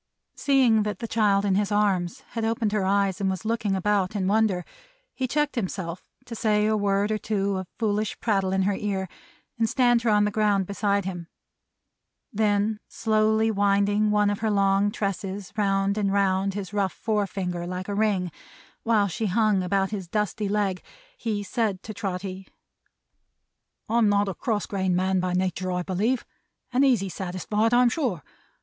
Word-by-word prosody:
'" - - -56
Seeing 255 -6 +3
that 210 -2 -2
the 230 - -5
child 205 -3 +2
in 195 - +2
his 205 +2 +1
arms 195 -4 +1
had 230 - -4
opened 225 -1 0
her 205 -2 0
eyes, 200 0 +1
and 195 - +1
was 190 +3 -4
looking 220 -3 0
about 195 0 0
in 195 -2 0
wonder, 205 -3 +2 0.5
he 260 - -2
checked 295 +3 0
himself 185 -5 -4 0.2
to 240 - -8
say 210 -2 +1
a 215 0 +2
word 200 0 +1
or 215 - 0
two 200 -2 -1
of 185 -1 -5
foolish 215 -2 -1
prattle 195 -4 +1
in 190 0 +1
her 200 +1 +1
ear, 195 -1 -2 0.5
and 225 -1 +2
stand 240 -2 +3
her 235 - +1
on 210 -1 +4
the 210 - 0
ground 205 -2 +2
beside 200 0 0
him. 175 -3 -5 1.1
Then 210 0 +1
slowly 220 0 +1
winding 205 +1 +2
one 210 -1 +3
of 205 - -3
her 220 - 0
long 200 0 +3
tresses 195 -1 -4
round 200 0 +1
and 200 -2 +1
round 195 -1 +1
his 200 -1 -5
rough 200 -3 0
forefinger 195 -5 -2
like 180 +1 -5
a 205 - -3
ring, 200 -4 0 0.5
while 215 -3 +2
she 215 +4 -2
hung 210 0 +2
about 195 +2 0
his 195 -4 -4
dusty 210 +1 -1
leg, 200 -3 0 0.3
he 215 - -3
said 205 -3 -1
to 215 - -7
Trotty, 190 -1 -5 1.4
"I'm 225 -1 +3
not 205 0 +2
a 195 - -2
cross 215 +2 -2
grained 190 -2 -1
man 185 +1 +1
by 180 0 -1
natur', 185 0 -1
I 180 0 -1
believe; 210 +8 0 0.5
and 260 +2 +4
easy 245 -8 +3
satisfied, 190 +5 -1
I'm 245 0 +5
sure. 230 - -2
205 Hz, 175 wpm, -25 LUFS, 190-215 Hz, 1.4 s, I'm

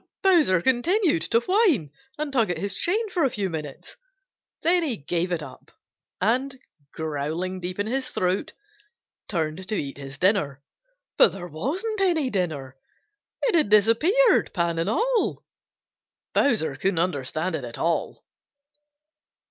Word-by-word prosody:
Bowser 310 - +4
continued 310 - +2
to 230 +8 +2
whine 330 - +2 0.3
and 300 -2 -4
tug 230 -6 +2
at 175 - -1
his 200 +3 -1
chain 430 - +1
for 355 -3 0
a 270 - +3
few 200 -5 -3
minutes. 150 -4 -7 0.7
Then 350 +2 +5
he 275 -9 -1
gave 170 +5 -2
it 165 -3 -1
up 130 -3 -12 0.5
and, 255 +6 0 0.3
growling 160 +4 -3
deep 180 0 -5
in 205 - -1
his 255 +3 -2
throat, 185 - -1 0.8
turned 170 0 -2
to 215 - -2
eat 140 -6 -4
his 140 0 -9
dinner. 180 -8 +1 0.6
But - - +6
there 180 -2 -7
wasn't 340 - -3
any 325 -9 +2
dinner! 150 -9 -3 0.7
It - - +2
had 315 -10 +3
disappeared, 230 - +4
pan 170 -1 0
and 165 +4 0
all! 470 - 0 0.9
Bowser 215 - +2
couldn't 190 +2 0
understand 165 +1 -1
it 155 -4 -3
at 120 -1 -6
all. 170 0 -2
195 Hz, 140 wpm, -24 LUFS, -, 0.9 s, But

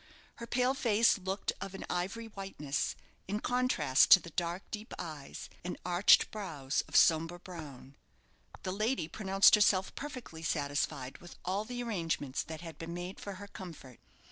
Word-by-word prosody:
Her 235 - -7
pale 250 +2 +2
face 230 -5 +3
looked 190 +1 -2
of 195 -1 -5
an - - -6
ivory 195 +6 -2
whiteness, 195 -9 -3 0.3
in 205 +2 -1
contrast 245 - +3
to 190 - +11
the 170 - -11
dark, 175 +3 -2
deep 215 +2 -6
eyes, 155 -5 -7 0.2
and 180 - -4
arched 180 +2 +5
brows 145 -10 -2
of - - -9
sombre 165 +1 +5
brown. 150 -7 -10 0.7
The 185 - -2
lady 215 -2 0
pronounced 195 +2 +4
herself 200 -3 +4
perfectly 255 - -7
satisfied 145 -4 -2
with 175 - -12
all 195 +4 -1
the 245 +1 -4
arrangements 165 - -2
that 160 0 -7
had 165 -2 -9
been 165 +1 -5
made 180 +2 -6
for 200 - -6
her 200 +2 -9
comfort. 165 - -10
185 Hz, 160 wpm, -32 LUFS, 160-210 Hz, 0.7 s, to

